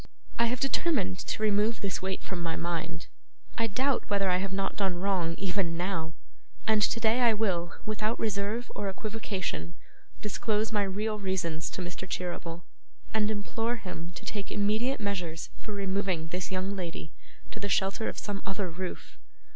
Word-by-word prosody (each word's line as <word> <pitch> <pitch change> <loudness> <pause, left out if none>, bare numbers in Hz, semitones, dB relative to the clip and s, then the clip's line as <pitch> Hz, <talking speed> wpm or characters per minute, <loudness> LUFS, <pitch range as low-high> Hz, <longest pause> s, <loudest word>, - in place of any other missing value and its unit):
I 235 - +6
have 250 +1 0
determined 245 - +2
to 215 - -2
remove 210 +2 +3
this 195 -2 -1
weight 190 0 -1
from 185 -2 -3
my 165 -1 0
mind. 170 -1 -2 0.5
I 230 -1 +2
doubt 260 +6 +2
whether 200 -2 +3
I 180 - +5
have 190 +1 -1
not 195 0 0
done 190 -3 +1
wrong, 180 -4 +2
even 185 -3 +1
now; 165 -3 -1 0.5
and 220 -1 +5
today 225 +2 +4
I 235 -3 +6
will, 180 -5 +1
without 215 +1 0
reserve 215 +2 0
or 200 - -1
equivocation, 190 - -3 0.4
disclose 215 +1 +1
my 210 -2 +3
real 210 +2 0
reasons 175 -5 0
to 185 - -3
Mr 180 +1 -5
Cherryble, 175 -1 -3 0.5
and 215 -1 +3
implore 225 +3 0
him 180 -6 -5
to - - -8
take 205 -2 -2
immediate 215 +6 +2
measures 180 -6 -2
for 215 - -6
removing 195 -4 0
this 180 +2 -2
young 190 +2 0
lady 170 -4 -4 0.4
to - - -5
the 205 -1 -1
shelter 195 +3 +2
of - - -6
some 205 -1 -2
other 195 -2 -1
roof. 180 +2 -5
195 Hz, 165 wpm, -31 LUFS, 180-215 Hz, 0.5 s, I